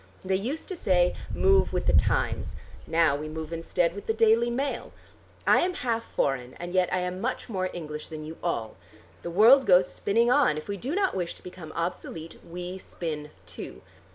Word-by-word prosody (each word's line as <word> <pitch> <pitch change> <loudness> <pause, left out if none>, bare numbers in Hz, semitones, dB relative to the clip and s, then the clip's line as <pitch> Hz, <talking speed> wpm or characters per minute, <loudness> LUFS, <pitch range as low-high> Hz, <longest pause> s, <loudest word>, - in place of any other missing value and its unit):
They 190 0 +1
used 250 +11 -3
to 375 - -3
say 180 - +2 0.2
'Move 390 0 +3
with - - -1
the - - +3
Times.' - - +1 0.3
Now 160 -3 +3
we 150 +2 -5
move 160 +1 -6
instead 165 +1 0
with 200 - -9
the 220 - +1
'Daily 225 +2 +4
Mail.' 270 +4 -2 0.5
I - - +6
am 365 0 0
half 230 -2 -2
foreign 130 -2 -1
and 175 +1 -7
yet 185 -1 +2
I 185 - +1
am 180 +1 -3
much 250 +3 -2
more 185 -4 -1
English 150 -3 -6
than 155 -2 -7
you 160 +1 -8
all. 115 - -2 0.4
The 170 - -5
world 230 +9 +6
goes 180 -1 +5
spinning 230 +4 +2
on. 255 - +4
If 155 - -6
we 200 - -2
do 265 - -3
not 390 -1 +2
wish 175 -2 -3
to - - -17
become 180 -3 -9
obsolete 165 -1 -4
we 180 +2 -6
spin 155 -5 -5 0.2
too. - - -8
180 Hz, 195 wpm, -27 LUFS, 165-230 Hz, 0.5 s, I